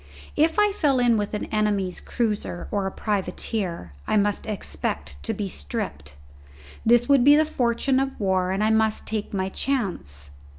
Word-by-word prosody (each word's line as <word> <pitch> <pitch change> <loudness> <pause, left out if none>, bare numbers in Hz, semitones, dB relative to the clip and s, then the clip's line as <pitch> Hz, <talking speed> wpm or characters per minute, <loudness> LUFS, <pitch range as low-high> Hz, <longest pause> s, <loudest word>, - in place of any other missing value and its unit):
If 320 +2 +2
I 420 -1 +4
fell 295 -9 +2
in 240 -2 +4
with 210 0 -1
an 210 - -3
enemy's 205 -4 0
cruiser 210 -6 -2
or 200 -2 0
a - - -3
privateer 185 - -3
I - - +2
must 205 +1 +1
expect 75 - -3
to - - -2
be 205 - -3
stripped. 70 - -5 0.7
This 240 +1 +4
would 280 -3 +5
be 290 +3 +8
the 310 +1 +4
fortune 260 -1 +1
of 270 0 -2
war, 190 -3 +1
and 195 +2 0
I 215 - +3
must 220 -1 +2
take 215 -2 -3
my 190 -2 -1
chance. 175 - -2
210 Hz, 170 wpm, -24 LUFS, 190-245 Hz, 0.7 s, be